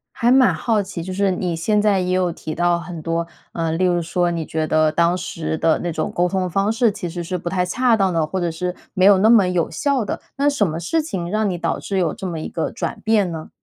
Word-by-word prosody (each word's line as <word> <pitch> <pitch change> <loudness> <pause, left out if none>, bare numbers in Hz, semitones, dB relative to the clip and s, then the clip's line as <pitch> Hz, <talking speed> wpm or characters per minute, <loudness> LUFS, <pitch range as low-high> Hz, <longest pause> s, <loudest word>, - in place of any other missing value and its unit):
还 235 +1 +2
蛮 260 -1 +5
好 225 -3 0
奇， 190 -3 -6
就 185 +2 -5
是 195 0 +1
你 180 -2 -2
现 210 +6 +1
在 205 -2 +3
也 180 0 -1
有 185 -1 +1
提 155 -1 -6
到 175 +1 +1
很 170 -1 -7
多， 165 +1 -2 0.3
呃， 165 -1 -1
例 170 +3 +1
如 175 -1 +2
说 175 +1 0
你 165 -2 -3
觉 155 0 -2
得 155 0 +3
当 170 +3 +2
时 160 -3 -4
的 160 0 +2
那 175 - -3
种 160 - -2
沟 175 +1 +1
通 185 0 -1
方 195 +4 +1
式 230 0 +2
其 200 -3 -5
实 175 +1 -5
是 180 +2 -3
不 175 0 -4
太 180 0 0
恰 245 +5 +2
当 195 -4 +1
的， 165 -2 +1
或 190 +4 -3
者 170 -1 0
是 180 +2 -3 0.2
没 185 -2 +3
有 200 -1 +7
那 215 +3 +4
么 220 -5 +6
有 180 -2 0
效 275 - 0
的。 205 - -4 0.2
那 285 +1 +3
什 250 -9 +1
么 160 0 -3
事 315 - 0
情 190 - -4
让 215 +1 0
你 180 - -2
导 - - -2
致 195 - -3
有 175 -4 +1
这 190 - -6
么 170 -3 -4
一 - - -5
个 165 - -2
转 230 - -4
变 215 -5 +2
呢？ 160 -1 -7
180 Hz, 290 characters per minute, -21 LUFS, 170-205 Hz, 0.3 s, 有